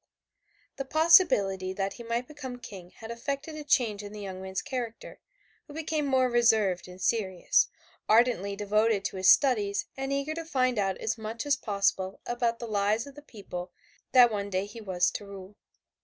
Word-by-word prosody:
The 275 - -3
possibility 265 - +4
that 195 0 -2
he 240 - -10
might 235 +2 -2
become 280 -4 -8
King 195 -7 -10
had 225 +4 -10
effected 275 +6 -4
a 305 - -6
change 245 -8 +1
in 205 0 -9
the 210 - -8
young 190 -2 -6
man's 190 0 -4
character, 240 -4 -6 0.5
who 295 - -12
became 310 -2 -2
more 260 -1 +3
reserved 220 -7 +2
and 180 0 -12
serious, 190 -3 +2 0.4
ardently 215 -4 +3
devoted 210 0 +1
to - - -3
his 185 0 +4
studies 210 -8 +3
and 270 0 -4
eager 280 +2 -1
to 330 +1 -5
find 255 -7 0
out 195 -2 0
as 225 +1 -3
much 220 +3 -5
as 290 -1 +3
possible 195 -4 -1
about 240 -1 -1
the 235 - -6
lives 210 +1 +1
of 280 - -11
the 295 - -12
people 185 -9 -8 0.4
that 245 -2 +7
one 200 -1 -3
day 190 0 -1
he 215 +3 -10
was 180 -4 +1
to - - -6
rule. 195 0 -10
225 Hz, 185 wpm, -28 LUFS, 195-260 Hz, 0.5 s, that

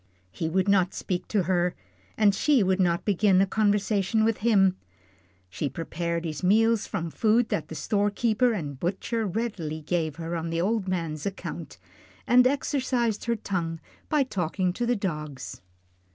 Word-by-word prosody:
He 160 - -3
would 190 +3 +1
not 190 -2 +3
speak 180 -2 -3
to 205 -4 +1
her, 175 0 +1 0.4
and 210 -2 +4
she 270 +3 +3
would 190 0 +1
not 175 -2 +1
begin 200 -1 +3
a 195 - +5
conversation 205 0 +1
with 225 -1 +2
him. 195 -4 +3 0.7
She 140 +10 -3
prepared 170 +3 -3
his 155 -2 -4
meals 220 +4 +3
from 165 -1 -3
food 225 +4 +2
that - - -2
the - - -8
storekeeper 215 +3 +1
and 145 - -4
butcher 215 - -2
readily 185 -7 -3
gave 160 -1 -1
her 165 +1 -4
on 165 0 -3
the 165 0 -1
old 200 +2 0
man's 165 -3 -2
account, 195 - -6 0.5
and 250 +1 +6
exercised 255 -5 0
her 235 0 +1
tongue 170 -6 -3 0.3
by 300 -2 +3
talking 185 -5 -1
to 240 +4 -2
her 245 - +2
dogs. 150 - -5
190 Hz, 160 wpm, -26 LUFS, 170-220 Hz, 0.7 s, and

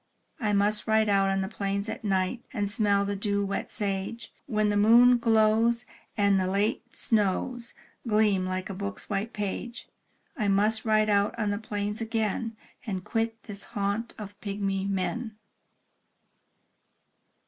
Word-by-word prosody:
I 215 -5 0
must 205 +1 +2
ride 220 -1 +3
out 195 -1 +3
on 195 0 +1
the 190 - -2
plains 200 0 -2
at - - -5
night, 195 +3 0
And 205 -4 -1
smell 205 -2 +2
the 200 0 -2
dew 200 0 0
wet 200 0 -3
sage. 200 +2 -3
When 215 -4 +1
the 205 - +1
moon 240 +4 +6
glows, 225 +1 +3 0.3
and 200 -2 +3
the 185 - 0
late 210 +4 -1
snows 230 +3 +1 0.3
Gleam 210 -3 +3
like 185 0 -3
a - - -4
book's 200 +2 -6
white 205 +3 -1
page; 210 +3 -4 0.5
I 215 -8 -1
must 210 +3 +2
ride 215 -1 +3
out 200 +2 +2
on 215 -3 0
the 205 - -2
plains 210 0 -3
again, 225 0 -2 0.3
And 190 -6 -4
quit 225 0 -2
this 205 -2 -6 0.2
haunt 205 +3 -1
of 205 -1 -9
pygmy 195 -1 -2
men. 215 +4 -2
210 Hz, 150 wpm, -27 LUFS, 200-225 Hz, 0.5 s, moon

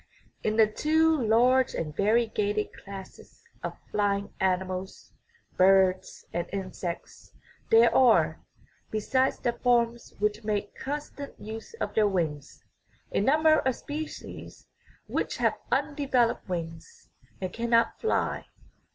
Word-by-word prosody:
In 215 - 0
the 220 - +7
two 315 +8 +2
large 250 +1 +3
and 155 -2 -4
variegated 210 0 +1
classes 195 -1 -11 0.2
of - - -5
flying 200 -1 0
animals, 185 0 -2 0.5
birds 185 0 +3
and 175 0 -2
insects, 185 -3 -6 0.4
there 230 +1 +6
are, 250 -4 +4 0.5
besides 260 +5 +1
the 240 - -1
forms 235 -1 0
which 210 +2 -1
make 210 -1 -2
con 290 +2 -4
stant 285 -1 -10
use 220 - -8
of - - -4
their 215 -1 +4
wings, 155 -7 -3 0.5
a - - +1
number 310 +8 +4
of 260 -2 0
species 310 +2 -7 0.4
which - - -2
have - - +2 0.2
undeveloped 265 -8 +1
wings 170 - -6 0.3
and 185 -1 -4
cannot 230 0 +1
fly. 445 - -1
215 Hz, 115 wpm, -28 LUFS, 190-255 Hz, 0.5 s, the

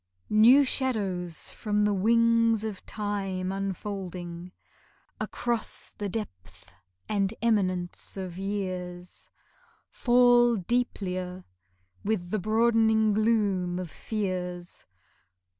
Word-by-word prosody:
New 235 +7 +7
shadows 195 - -1
from 210 -1 0
the 210 - +2
wings 230 +2 +3
of 215 -3 -5
Time 195 -3 -3
unfolding 185 -3 -5 0.7
Across 235 -2 -3
the 205 -1 -2
depth 95 - -7 0.4
and 200 0 0
eminence 185 -6 0
of 185 -3 -5
years, 185 -2 -5 0.6
Fall 240 -1 +4
deeplier 185 -4 -2 0.6
with 200 -4 -2
the 215 - 0
broadening 220 +1 +3
gloom 200 -5 +1
of 180 -3 -5
fears. 180 -4 -4
200 Hz, 90 wpm, -27 LUFS, 180-220 Hz, 0.7 s, New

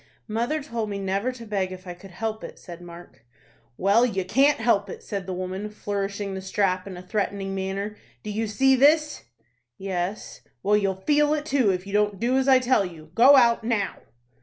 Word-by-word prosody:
"Mother 240 +8 -1
told 230 -6 -4
me 200 - -3
never 195 +5 -1
to 245 -2 -11
beg 195 -3 -2
if 185 0 -9
I 180 - -6
could 180 +2 -14
help 220 +4 -4
it," - - -8
said 175 -1 -11
Mark. 170 -8 -13 0.5
"Well, 200 +5 +4
you 195 -7 0
can't 275 +9 +3
help 215 -3 +1
it," - - -8
said 195 -3 -5
the 185 - -3
woman, 185 +3 -4
flourishing 200 -1 -4
the 190 - -5
strap 190 -1 0
in 185 -2 -7
a 180 - -9
threatening 195 0 -2
manner. 195 +2 -3 0.3
"Do 215 - -5
you 220 +2 -2
see 265 +6 +3
this?" 300 +3 +3 0.5
"Yes." 190 +1 -4 0.2
"Well, 205 +1 +3
you'll 195 -2 -1
feel 295 0 +3
it 300 0 -4
too, 265 -7 +2
if 185 0 -1
you 200 - -8
don't 205 -2 +1
do 245 +4 +1
as 265 0 +1
I 265 -1 +7
tell 255 -4 +2
you. 160 -4 -9
Go 255 +8 +7
out 235 -3 +4
now." 220 -4 -1
205 Hz, 205 wpm, -25 LUFS, 190-235 Hz, 0.5 s, I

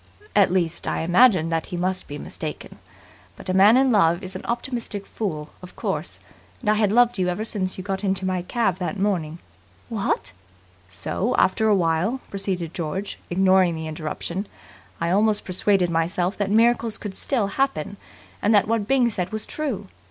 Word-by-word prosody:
At 200 -4 +5
least, 175 -3 0
I - - -1
imagined 175 -1 +4
that 165 -1 -1
he 175 - -5
must 185 +1 -1
be 145 - -6
mistaken. - - -6 0.6
But - - -9
a - - +1
man 200 +5 +7
in 265 -1 +4
love 175 -3 +3
is 185 0 -7
an 185 - -6
optimistic 235 -4 -3
fool, 155 -8 -4
of 180 - -12
course, - - -3 0.4
and 210 -4 +1
I - - +5
had 210 -2 +2
loved 240 -1 +4
you 180 - +1
ever 180 +5 -2
since 190 -4 -2
you 185 - -5
got 195 +1 -3
into 190 -1 0
my 185 -1 0
cab 195 0 0
that 185 +3 -3
morning.. 180 -6 -1 0.3
." - - -31
"What!" 200 - -2 0.6
"So 90 - -2
after 220 +4 +3
a 210 - +5
while," 175 +7 +1
proceeded 185 -4 -3
George, 185 +4 -4
ignoring 185 -1 +3
the 160 0 -5
interruption, 160 +5 -4 0.5
"I 170 0 0
almost 210 +2 +2
persuaded 185 -1 +1
myself 175 +3 0
that 205 -1 -1
miracles 230 +1 +3
could 205 -3 -6
still 245 -7 0
happen, 200 - -1 0.4
and 210 +1 +3
that 205 - +4
what 220 -2 0
Byng 255 -2 +3
said 180 -3 -3
was 215 0 -3
true. 290 -9 -3
190 Hz, 180 wpm, -23 LUFS, 175-215 Hz, 0.6 s, man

